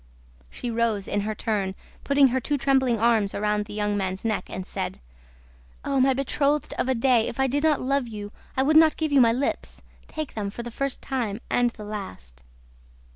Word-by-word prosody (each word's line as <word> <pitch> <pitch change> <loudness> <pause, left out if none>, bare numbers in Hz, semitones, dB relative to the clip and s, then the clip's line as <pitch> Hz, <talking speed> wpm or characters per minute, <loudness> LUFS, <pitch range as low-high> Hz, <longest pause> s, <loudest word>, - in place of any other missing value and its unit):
She 240 - -5
rose 225 -3 0
in 205 - 0
her 215 +1 -3
turn, 205 -4 -1 0.3
put 280 - -1
her 260 -2 +5
two 290 +3 -1
trembling 265 -3 +2
arms 220 -3 +2
round 210 0 0
the 210 - -10
young 210 -1 0
man's 190 0 -3
neck 215 -2 0
and 185 - -5
said: - - -4 0.9
"Oh, 275 -1 +2
my 265 0 +4
betrothed 280 +2 0
of 260 - 0
a 260 - +2
day, 235 -1 +3
if 235 - -6
I 265 - +4
did 275 +2 0
not 310 -2 +3
love 270 0 0
you, 205 -2 -7 0.3
I 265 - +4
would 310 +3 +4
not 315 -1 +6
give 315 -2 -1
you 280 -2 +6
my 230 -1 +6
lips! 260 +4 -3 0.2
Take 310 -3 -5
them, 205 -2 -3
for 235 +4 -7
the 240 - -7
first 275 +3 -3
time 235 -6 -2
and 245 0 +3
the 220 -2 -11
last." 95 - -7
235 Hz, 205 wpm, -25 LUFS, 210-270 Hz, 0.9 s, not